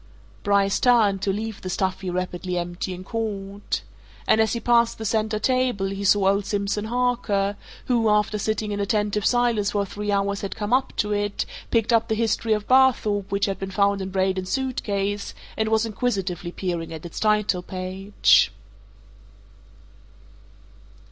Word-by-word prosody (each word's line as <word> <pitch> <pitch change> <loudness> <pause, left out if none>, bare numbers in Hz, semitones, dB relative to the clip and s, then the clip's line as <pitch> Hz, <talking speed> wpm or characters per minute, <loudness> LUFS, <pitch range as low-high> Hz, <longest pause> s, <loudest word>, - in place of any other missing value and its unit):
Bryce 200 -1 +2
turned, 215 -6 +4
to 200 - +1
leave 215 +1 -4
the 185 - -5
stuffy, 185 0 -2
rapidly 180 0 -3
emptying 175 +1 -4
court. 200 -2 -4 0.4
And 220 - +5
as 220 -2 +1
he 235 - -1
passed 235 0 +3
the 220 - -6
centre 215 0 0
table 250 -4 +1
he 195 +1 -4
saw 200 0 +4
old 200 +1 +2
Simpson 205 0 -1
Harker, 230 -4 0 0.3
who, 235 -3 +2
after 210 0 +2
sitting 215 0 -1
in 205 - -2
attentive 210 0 0
silence 240 -4 +2
for 200 -1 +1
three 205 +1 -4
hours 200 0 0
had 200 - -4
come 210 +2 -2
up 265 +1 +2
to 210 - 0
it, 205 0 -1 0.2
picked 230 0 +2
up 230 0 +3
the 220 - 0
"History 225 0 +1
of 210 -1 -2
Barthorpe" 220 -6 +3
which 200 0 +1
had 195 -1 -3
been 195 - -4
found 200 +1 +1
in 190 - -4
Braden's 190 -1 0
suit 265 -2 -1
case 200 0 -2 0.2
and 220 0 0
was 220 0 +2
inquisitively 195 -6 -2
peering 175 -3 -3
at 160 0 -8
its 170 - -6
title 210 -4 +2
page. 185 - +2
205 Hz, 160 wpm, -24 LUFS, 195-220 Hz, 0.4 s, And